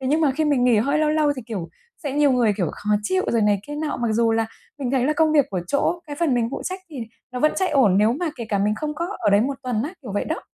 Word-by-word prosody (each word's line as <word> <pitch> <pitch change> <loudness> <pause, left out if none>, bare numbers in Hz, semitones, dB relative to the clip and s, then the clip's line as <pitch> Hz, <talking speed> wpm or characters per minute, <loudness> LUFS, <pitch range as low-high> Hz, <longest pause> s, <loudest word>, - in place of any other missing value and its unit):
thế 260 - -4
nhưng 305 +4 +2
mà 305 -3 +3
khi 310 +4 0
mình 285 -5 +2
nghỉ 245 -2 +4
hơi 280 +7 +1
lâu 310 0 +2
lâu 305 -1 +2
thì, 255 - -6
kiểu, 200 -8 -5 0.3
sẽ 285 -4 -3
nhiều 290 -1 +3
người, 240 -4 +3
kiểu, 180 -5 0
khó 210 - -5
chịu 375 - +1
rồi 230 -2 +2
này 205 -1 +2
kia 295 - -6
nọ, 300 0 -2
mặc 240 -1 -1
dù 230 0 +2
là 225 0 +1 0.3
mình 260 -3 -2
thấy 260 -2 +1
là 300 - +2
công 315 0 +3
việc 290 -3 +4
của 185 -3 -2
chỗ 285 - 0
cái 290 - -6
phần 300 -5 +1
mình 230 -1 +1
phụ - - -5
trách 370 +1 -4
thì 300 - -9 0.4
nó 250 - -4
vẫn 305 +2 +3
chạy 375 - +1
ổn 240 -10 +4
nếu 215 +3 +4
mà 345 +7 -2
kể 235 - -5
cả 205 - 0
mình 210 +2 +1
không 300 +6 -4
có 340 +3 -2
ở - - +1
đấy 200 +1 +5
một 270 +5 0
tuần 245 -4 -1
á, 295 - -3
kiểu 210 -7 -7
vậy 205 - -1
đó. 320 - -3
265 Hz, 320 wpm, -23 LUFS, 225-300 Hz, 0.4 s, đấy